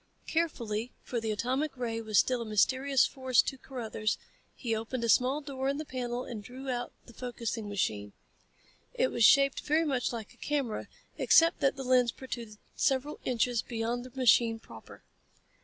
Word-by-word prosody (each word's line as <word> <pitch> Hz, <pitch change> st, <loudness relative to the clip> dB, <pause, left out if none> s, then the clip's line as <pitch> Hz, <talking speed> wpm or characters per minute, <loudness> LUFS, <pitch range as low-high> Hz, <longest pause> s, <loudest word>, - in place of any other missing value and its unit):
Carefully, 240 Hz, -9 st, -1 dB
for 240 Hz, -2 st, -3 dB
the 225 Hz, -, -2 dB
atomic 260 Hz, +7 st, -1 dB
ray 230 Hz, -2 st, -2 dB
was 215 Hz, -2 st, 0 dB
still 250 Hz, +6 st, +3 dB
a -, -, -4 dB
mysterious 260 Hz, +6 st, +3 dB
force 260 Hz, -2 st, 0 dB
to -, -, -3 dB
Carruthers, 225 Hz, -5 st, -3 dB, 0.4 s
he 230 Hz, -4 st, -2 dB
opened 230 Hz, +3 st, -3 dB
a -, -, +1 dB
small 260 Hz, +6 st, +3 dB
door 270 Hz, -2 st, -3 dB
in 280 Hz, -, -1 dB
the 310 Hz, -, -4 dB
panel 250 Hz, -2 st, -3 dB
and 215 Hz, -3 st, -7 dB
drew 260 Hz, +3 st, -6 dB
out 245 Hz, -1 st, -3 dB
the 235 Hz, -, -14 dB
focusing 230 Hz, -3 st, -4 dB
machine. 105 Hz, -, -2 dB, 0.8 s
It -, -, +2 dB
was 235 Hz, -, +1 dB
shaped 275 Hz, +3 st, +6 dB
very 315 Hz, +2 st, +1 dB
much 265 Hz, -5 st, 0 dB
like 225 Hz, -3 st, -6 dB
a -, -, -24 dB
camera 275 Hz, -7 st, -2 dB, 0.3 s
except 330 Hz, +1 st, +5 dB
that 275 Hz, -, +2 dB
the 270 Hz, -, -5 dB
lens 250 Hz, -2 st, +3 dB
protruded 235 Hz, -5 st, -7 dB, 0.2 s
several 275 Hz, +2 st, 0 dB
inches 245 Hz, -1 st, +1 dB
beyond 235 Hz, +1 st, -3 dB
the 255 Hz, +1 st, -10 dB
machine 235 Hz, -2 st, +5 dB
proper. 225 Hz, -, -13 dB
245 Hz, 175 wpm, -30 LUFS, 225-270 Hz, 0.8 s, shaped